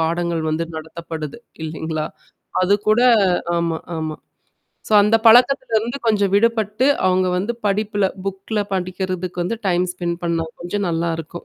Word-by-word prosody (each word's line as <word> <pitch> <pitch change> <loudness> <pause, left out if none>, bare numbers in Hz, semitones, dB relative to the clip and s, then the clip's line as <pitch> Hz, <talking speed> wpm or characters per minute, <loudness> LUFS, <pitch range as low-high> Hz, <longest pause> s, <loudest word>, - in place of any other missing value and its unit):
பாடங்கள் 170 0 0
வந்து 165 +2 -1
நடத்தப்படுது. 160 +2 -7 0.2
இல்லைங்களா? 160 0 -3 0.6
அது 195 +2 +4
கூட 215 +2 +4 0.6
ஆமா 165 -1 -1 0.2
ஆமா. 155 -1 -3 0.7
சோ - - -8
அந்த 210 +2 +4
பழக்கத்தில 245 +1 +5
இருந்து 235 +5 -4
கொஞ்சம் 205 -3 +2
விடுபட்டு 220 +3 +2 0.2
அவங்க 185 0 +3
வந்து 200 +6 -1
படிப்பில 205 0 +1 0.2
புக்ல 195 +2 -3
படிக்கிறதுக்கு 185 -1 -3
வந்து 230 +6 -2
டைம் 180 0 +2
ஸ்பெண்ட் 175 -1 -3
பண்ணா 165 -1 0 0.2
கொஞ்சம் 195 +3 -2
நல்லாருக்கும். 165 0 -3
185 Hz, 130 wpm, -20 LUFS, 165-210 Hz, 0.7 s, பழக்கத்தில